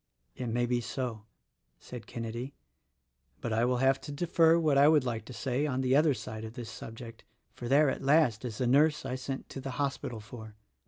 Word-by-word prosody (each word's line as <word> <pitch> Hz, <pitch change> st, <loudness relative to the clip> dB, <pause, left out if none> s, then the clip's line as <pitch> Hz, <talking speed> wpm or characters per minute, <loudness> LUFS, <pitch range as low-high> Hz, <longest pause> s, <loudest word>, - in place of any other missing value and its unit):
"It 125 Hz, -, -4 dB
may 120 Hz, +2 st, 0 dB
be 120 Hz, 0 st, 0 dB
so," 115 Hz, -3 st, -4 dB, 0.5 s
said 125 Hz, -2 st, -10 dB
Kenedy, 115 Hz, +3 st, -5 dB, 0.8 s
"but 115 Hz, -, -3 dB
I 115 Hz, +2 st, +2 dB
will 125 Hz, 0 st, +1 dB
have 135 Hz, +1 st, +2 dB
to -, -, -7 dB
defer 165 Hz, +2 st, +3 dB
what 155 Hz, -4 st, +2 dB
I 140 Hz, +1 st, +6 dB
would 155 Hz, -3 st, +5 dB
like 115 Hz, -3 st, -3 dB
to -, -, -10 dB
say 130 Hz, +3 st, -1 dB
on 130 Hz, -2 st, -1 dB
the 130 Hz, 0 st, +2 dB
other 150 Hz, -1 st, +4 dB
side 110 Hz, 0 st, -7 dB
of 110 Hz, 0 st, -7 dB
this 120 Hz, -2 st, -7 dB
subject, 115 Hz, 0 st, -9 dB, 0.3 s
for 120 Hz, -, -7 dB
there 145 Hz, +4 st, +5 dB
at -, -, -1 dB
last, 140 Hz, -6 st, +3 dB
is 115 Hz, -4 st, -5 dB
the 130 Hz, -, 0 dB
nurse 150 Hz, +5 st, +3 dB
I'sent 130 Hz, +1 st, -4 dB
to 135 Hz, -, -7 dB
the 130 Hz, -2 st, -6 dB
hospital 140 Hz, -5 st, -2 dB
for. 110 Hz, 0 st, -11 dB
125 Hz, 205 wpm, -30 LUFS, 115-140 Hz, 0.8 s, I